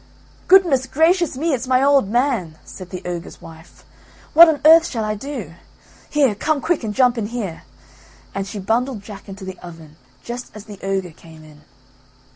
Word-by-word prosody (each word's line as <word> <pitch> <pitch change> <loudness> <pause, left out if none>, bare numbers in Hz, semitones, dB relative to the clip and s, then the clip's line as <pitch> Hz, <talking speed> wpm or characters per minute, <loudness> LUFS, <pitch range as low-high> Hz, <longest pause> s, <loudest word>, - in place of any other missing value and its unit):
"Goodness 335 -9 +4
gracious 325 +2 +1
me! 320 +2 0
It's 255 -1 -3
my 255 +1 +3
old 275 -7 +3
man," 235 - -1
said 185 -2 -11
the 180 -1 -8
ogre's 175 -1 -6
wife, 160 +1 -15 0.5
"what 335 +2 +9
on 300 -2 0
earth 325 +1 +7
shall 225 -4 -3
I 215 0 -1
do? 220 - -7 0.6
Here, 280 -6 +2
come 300 +8 -1
quick 325 -2 -1
and 215 - -3
jump 250 +1 +2
in 205 - -3
here." 215 -8 -6 0.7
And 195 0 -4
she 215 - -7
bundled 225 +3 -2
Jack 205 -1 -11
into 195 0 -9
the 190 -1 -8
oven 165 -3 -13 0.3
just 245 +1 -7
as 210 -1 -10
the 205 -3 -11
ogre 195 -2 -2
came 160 0 -16
in. 150 -1 -17
225 Hz, 180 wpm, -20 LUFS, 190-275 Hz, 0.7 s, what